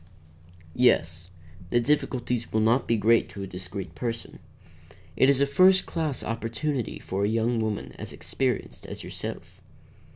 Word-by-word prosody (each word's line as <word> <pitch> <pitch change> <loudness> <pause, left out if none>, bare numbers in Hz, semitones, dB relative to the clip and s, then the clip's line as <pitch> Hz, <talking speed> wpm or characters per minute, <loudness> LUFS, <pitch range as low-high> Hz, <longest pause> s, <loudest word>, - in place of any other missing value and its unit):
"Yes. 85 -8 +2 0.4
The 120 - +3
difficulties 125 -3 0
will 110 - +2
not 115 +4 +3
be 115 - +2
great 115 +2 +3
to 100 - -7
a - - -3
discreet 95 +1 -6
person. 115 -2 -4 0.8
It 130 - +5
is 140 -1 +4
a 140 - +4
first 185 +7 +5
class 155 -6 -2
opportunity 115 +3 -2
for 95 +1 -3
a - - +3
young 115 +1 +1
woman 110 -2 -2
as - - -6
experienced 130 -5 -3
as - - -7
yourself." - - -7
115 Hz, 150 wpm, -27 LUFS, 110-130 Hz, 0.8 s, It